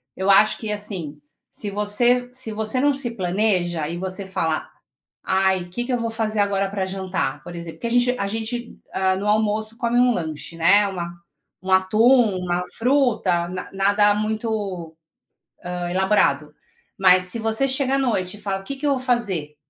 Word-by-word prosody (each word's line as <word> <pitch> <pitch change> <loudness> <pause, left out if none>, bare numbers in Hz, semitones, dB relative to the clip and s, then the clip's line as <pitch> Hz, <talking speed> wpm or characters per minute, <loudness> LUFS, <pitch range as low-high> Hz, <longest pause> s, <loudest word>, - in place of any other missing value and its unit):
Eu 190 +1 -2
acho 200 +2 +5
que 215 -2 -5
assim, 190 -8 -3 0.3
se 210 - -2
você 240 +5 +2
se 255 -3 -3
você 220 +3 -1
não 285 +2 +3
se 265 -4 0
planeja, 180 -4 0
e 170 - -4
você 190 +2 -2
fala: 165 -4 -2 0.5
"Ai, 190 -1 +1
que 240 +7 -3
que 255 - -2
eu - - +2
vou 230 -1 -2
fazer 220 -1 -2
agora 200 -1 +1
para 195 -1 -2
jantar?", 190 -1 -3
por 175 - -9
exemplo. 170 -1 -7
Porque 235 - -3
a - - -2
gente 250 +1 +1
a 200 - -1
gente 225 +3 -5 0.2
hã, 190 0 +1
no 200 +2 -3
almoço, 215 +1 0
come 240 -1 0
um 250 0 +4
lanche, 160 -3 -5
né, 200 +5 +4
uma 175 -3 -5 0.5
um 190 - -3
atum, 215 +3 +4
uma 180 0 -1
fruta 230 -9 +1
na 180 +1 -7
nada 205 +2 +3
muito, 210 -6 -3 0.7
hã, 180 -1 -3
elaborado. 175 -6 +1 0.4
Mas 185 -1 +5
se 180 +6 0
você 225 +4 +1
chega 265 0 +1
à - - +2
noite 210 -7 -1
e - - -11
fala: 195 -1 -2
"O - - -16
que 275 - -5
que 275 +2 -6
eu 285 - +3
vou 270 - 0
fazer? 200 - -1
205 Hz, 185 wpm, -22 LUFS, 185-230 Hz, 0.7 s, acho